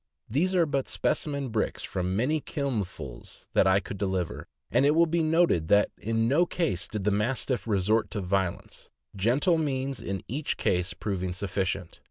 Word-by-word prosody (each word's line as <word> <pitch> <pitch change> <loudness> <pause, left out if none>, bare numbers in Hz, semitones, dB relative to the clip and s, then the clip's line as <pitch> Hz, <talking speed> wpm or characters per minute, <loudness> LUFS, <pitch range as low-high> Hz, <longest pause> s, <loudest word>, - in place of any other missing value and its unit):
These 175 - +1
are 175 -2 +4
but 140 -3 -1
specimen 140 -3 -1
bricks 110 -1 -1
from 90 0 -2
many 145 +8 +1
kilnfuls 135 - -5
that 95 - +4
I 95 +1 +5
could 100 0 -7
deliver; 95 -4 -2 0.2
and - - +4
it 145 +2 +4
will 170 +1 +6
be 170 +1 0
noted 160 - +3
that 105 +4 +4
in 115 +1 0
no 160 +8 +3
case 100 - -1
did 105 -2 -4
the 105 - +2
Mastiff 120 +4 0
resort 105 +2 +2
to 105 - -3
violence, 95 -1 -2 0.3
gentle 135 - +2
means 135 -3 -2
in 95 -2 -4
each 145 +5 -2
case 90 +2 0
proving 95 -3 -3
sufficient. 95 -2 -3
110 Hz, 170 wpm, -28 LUFS, 95-140 Hz, 0.3 s, will